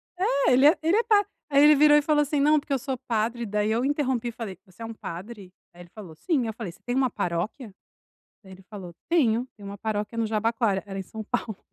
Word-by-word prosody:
É, 280 Hz, -8 st, +2 dB
ele 260 Hz, +3 st, +5 dB
é 315 Hz, -, +5 dB
ele 330 Hz, +6 st, +2 dB
é 465 Hz, -, +2 dB
padre. 415 Hz, -3 st, +3 dB, 0.2 s
Aí, 280 Hz, 0 st, +5 dB
ele 300 Hz, 0 st, +7 dB
virou 295 Hz, +1 st, +6 dB
e -, -, +4 dB
falou 295 Hz, 0 st, +2 dB
assim: 290 Hz, 0 st, 0 dB
"Não, 300 Hz, +2 st, +4 dB
porque 280 Hz, -, -5 dB
eu 270 Hz, -, +1 dB
sou 265 Hz, +1 st, -4 dB
padre". 235 Hz, -1 st, -2 dB
Daí 210 Hz, +1 st, -1 dB
eu 230 Hz, +2 st, 0 dB
interrompi 265 Hz, -5 st, 0 dB
e -, -, -6 dB
falei: 220 Hz, -6 st, -7 dB
"Você 185 Hz, +2 st, -19 dB
é -, -, -4 dB
um 225 Hz, -, -6 dB
padre?". 190 Hz, 0 st, -9 dB, 0.2 s
Aí, 175 Hz, -, -14 dB
ele 175 Hz, -, -18 dB
falou: 185 Hz, -7 st, -11 dB
"Sim". 270 Hz, -, -1 dB
Eu 220 Hz, -, -4 dB
falei: 215 Hz, -6 st, -6 dB
"Você -, -, -21 dB
tem 245 Hz, +1 st, -2 dB
uma 265 Hz, -1 st, +2 dB
paróquia?". 200 Hz, +4 st, -4 dB, 0.7 s
Daí, 190 Hz, -1 st, -13 dB
ele 190 Hz, -, -15 dB
falou: 190 Hz, -5 st, -9 dB, 0.2 s
"Tenho 250 Hz, -8 st, +2 dB
tenho 200 Hz, -2 st, -11 dB
uma 200 Hz, -, -8 dB
paróquia 215 Hz, +2 st, -3 dB
no 230 Hz, -, +1 dB
Jabaquara". 220 Hz, -2 st, 0 dB
Era 195 Hz, -1 st, -6 dB
em 190 Hz, -, -4 dB
São 220 Hz, +3 st, -8 dB
Paulo. 215 Hz, 0 st, -3 dB
230 Hz, 250 wpm, -25 LUFS, 205-280 Hz, 0.7 s, ele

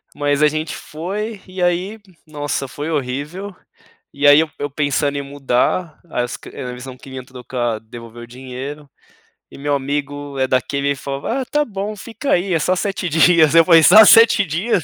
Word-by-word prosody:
mas 145 Hz, 0 st, 0 dB
a 150 Hz, -, +6 dB
gente 155 Hz, +1 st, -3 dB
foi 195 Hz, +6 st, -6 dB
e 185 Hz, 0 st, -7 dB
aí, 180 Hz, +5 st, 0 dB, 0.3 s
nossa, 145 Hz, -3 st, -4 dB
foi 145 Hz, +5 st, -6 dB
horrível, 150 Hz, +8 st, -4 dB, 0.6 s
e 140 Hz, +1 st, -2 dB
aí 145 Hz, +1 st, +8 dB
eu 160 Hz, -, +2 dB
p 150 Hz, -, -28 dB
eu 145 Hz, -, -3 dB
pensando 145 Hz, 0 st, -1 dB
em 140 Hz, -, -2 dB
mudar 140 Hz, +4 st, -1 dB
as 125 Hz, -2 st, -3 dB
cri -, -, -13 dB
eles 125 Hz, 0 st, -7 dB
não 130 Hz, -1 st, -9 dB
queriam 130 Hz, 0 st, -9 dB
trocar, 125 Hz, -3 st, -4 dB
devolver 115 Hz, +1 st, -11 dB
o 120 Hz, -, -11 dB
dinheiro, 130 Hz, +4 st, -8 dB, 0.6 s
e -, -, -12 dB
meu 145 Hz, +1 st, -2 dB
amigo 145 Hz, 0 st, -4 dB
é 130 Hz, -, +1 dB
daqueles, 130 Hz, +2 st, -1 dB
ele 140 Hz, -, 0 dB
falou: 140 Hz, 0 st, -6 dB
"Ah, 260 Hz, +2 st, -1 dB
tá 295 Hz, +4 st, 0 dB
bom, 205 Hz, 0 st, -5 dB
fica 230 Hz, +7 st, -5 dB
aí, 180 Hz, +1 st, +1 dB
é 165 Hz, -, +2 dB
só 185 Hz, +5 st, +1 dB
7 190 Hz, -2 st, -2 dB
dias", 160 Hz, 0 st, +4 dB
eu 165 Hz, -1 st, +7 dB
falei: 165 Hz, -2 st, +7 dB
"Só 210 Hz, +8 st, +9 dB
7 225 Hz, -3 st, +6 dB
dias?" 175 Hz, +3 st, -1 dB
145 Hz, 190 wpm, -19 LUFS, 135-180 Hz, 0.6 s, Só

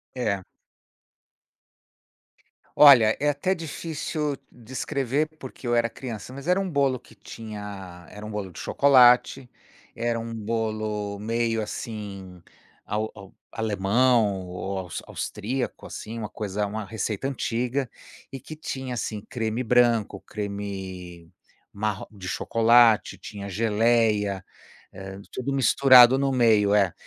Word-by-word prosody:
É. 105 Hz, -6 st, -1 dB, 2.4 s
Olha, 125 Hz, -7 st, +8 dB
é 150 Hz, -, 0 dB
até 145 Hz, +6 st, 0 dB
difícil 155 Hz, -3 st, -4 dB
descrever, 130 Hz, +4 st, -2 dB
porque 130 Hz, -2 st, -9 dB
eu 120 Hz, -, +2 dB
era 120 Hz, 0 st, +2 dB
criança, 115 Hz, -3 st, -7 dB
mas 140 Hz, +4 st, -9 dB
era 180 Hz, +1 st, +3 dB
um 195 Hz, -2 st, -2 dB
bolo 140 Hz, -4 st, +1 dB
que 120 Hz, -, -19 dB
tinha 100 Hz, -4 st, -9 dB
era 105 Hz, +1 st, -10 dB
um 105 Hz, -, -7 dB
bolo 105 Hz, -3 st, -4 dB
de 85 Hz, -, -11 dB
chocolate, 125 Hz, -1 st, +4 dB, 0.4 s
era 115 Hz, 0 st, -1 dB
um 115 Hz, 0 st, -5 dB
bolo 110 Hz, -2 st, -3 dB
meio, 115 Hz, +1 st, 0 dB
assim, 100 Hz, -4 st, -7 dB, 0.4 s
ao 110 Hz, +1 st, -2 dB
ao 100 Hz, -2 st, -14 dB, 0.2 s
alemão 105 Hz, -1 st, +1 dB
ou 95 Hz, +2 st, -5 dB
aus 90 Hz, -2 st, -6 dB
austríaco, 120 Hz, +5 st, -4 dB
assim, 110 Hz, +2 st, -7 dB
uma 110 Hz, -2 st, -5 dB
coisa 105 Hz, -1 st, -3 dB
uma 105 Hz, +1 st, -5 dB
receita 110 Hz, +3 st, -3 dB
antiga 125 Hz, 0 st, -2 dB, 0.4 s
e 135 Hz, -, -6 dB
que 155 Hz, -, -10 dB
tinha, 130 Hz, -4 st, -5 dB
assim, 110 Hz, -2 st, -4 dB
creme 115 Hz, 0 st, -2 dB
branco, 115 Hz, -4 st, +2 dB
creme 95 Hz, -4 st, -6 dB, 0.4 s
marro 105 Hz, -1 st, -3 dB
de 95 Hz, -4 st, -8 dB
chocolate, 115 Hz, -1 st, +4 dB
tinha 100 Hz, -1 st, -8 dB
geleia, 105 Hz, -1 st, +1 dB, 0.5 s
hã, 95 Hz, +1 st, -9 dB
tudo 130 Hz, +2 st, -3 dB
misturado 130 Hz, -1 st, +7 dB
no 135 Hz, 0 st, +1 dB
meio 110 Hz, -5 st, +4 dB
É. 100 Hz, -4 st, +3 dB
110 Hz, 125 wpm, -25 LUFS, 100-125 Hz, 2.4 s, Olha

